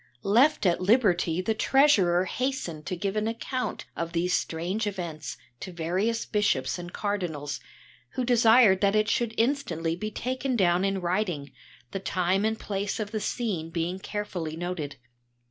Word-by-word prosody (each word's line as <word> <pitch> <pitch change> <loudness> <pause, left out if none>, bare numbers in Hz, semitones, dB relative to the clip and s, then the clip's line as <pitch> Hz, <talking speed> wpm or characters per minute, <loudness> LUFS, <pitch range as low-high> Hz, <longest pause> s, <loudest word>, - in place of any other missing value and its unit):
Left 245 +7 +4
at 175 -1 +3
liberty 185 -5 +3
the 220 - +1
treasurer 210 -9 +4
hastened 185 - -3
to 185 - -2
give 195 +3 -2
an 215 0 0
account 250 +3 -3
of 170 0 -4
these 175 +2 +1
strange 180 +7 -1
events 170 -6 -5 0.2
to 190 - -6
various 185 +7 -1
bishops 175 -11 0
and 175 0 -7
cardinals, 170 -10 -3 0.5
who 255 - -1
desired 230 -4 +6
that 200 0 +3
it 215 0 +3
should 225 0 0
instantly 175 - 0
be 215 +4 -4
taken 255 +4 -2
down 180 -3 +3
in 195 -1 0
writing, 175 -6 -1 0.4
the 195 - -3
time 185 +1 +1
and 220 0 0
place 200 0 -3
of 210 -1 -3
the 220 - -1
scene 200 -7 -2
being 170 +2 -2
carefully 190 -6 -4
noted. 170 -5 -4
195 Hz, 155 wpm, -27 LUFS, 175-220 Hz, 0.5 s, desired